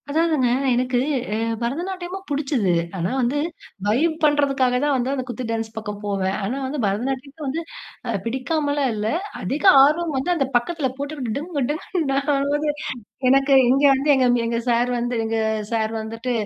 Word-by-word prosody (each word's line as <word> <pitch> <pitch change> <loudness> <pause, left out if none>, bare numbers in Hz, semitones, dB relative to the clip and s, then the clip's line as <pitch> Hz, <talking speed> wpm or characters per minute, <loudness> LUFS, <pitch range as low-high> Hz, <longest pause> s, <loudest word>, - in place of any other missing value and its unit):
அதாவதுங்க, 310 -3 +2 0.3
எனக்கு, 250 0 +1 0.3
அ, - - 0 0.3
பரதநாட்டியமும் 355 +8 -4
புடிச்சது. 275 - 0 0.3
ஆனா 175 +1 -1
வந்து, 255 +3 +1 0.5
வைப் 305 +10 +2
பண்றதுக்காக 280 -4 +3
தான் 290 -1 +2
வந்து 255 +1 0
அந்த 265 -2 -2
குத்து 245 0 -5
டான்ஸ் 225 -1 -2
பக்கம் 210 -2 -5
போவேன். 195 -1 -1
ஆனா 230 +7 -2
வந்து 280 +2 -3
பரதநாட்டியத்த 265 +8 -3
வந்து 305 +5 -2 0.5
அ - - 0
பிடிக்காமல்லாம் 285 +3 0
இல்ல. 210 0 -2 0.3
அதிக 270 +11 -3 0.2
ஆர்வம் 310 +2 +2
வந்து 265 +6 -2
அந்த 280 -5 +1
பக்கத்துல 280 +4 +1
போட்டுக்கு 280 -5 -4
டிங்கு, 300 0 -3
டிங்குன்னு 305 -2 -1 0.2
ஆவுது. 290 +2 0 0.6
எனக்கு 275 +1 +4 0.2
இங்க 270 +3 +3
வந்து 275 +3 0
எங்க, 260 -1 +3 0.2
எங்க 230 0 -1
சார் 240 +1 +2
வந்து, 240 +1 -2
எங்க 225 0 -1 0.3
சார் 220 -1 0
வந்துட்டு, 225 +3 -4
270 Hz, 155 wpm, -22 LUFS, 235-295 Hz, 0.6 s, எனக்கு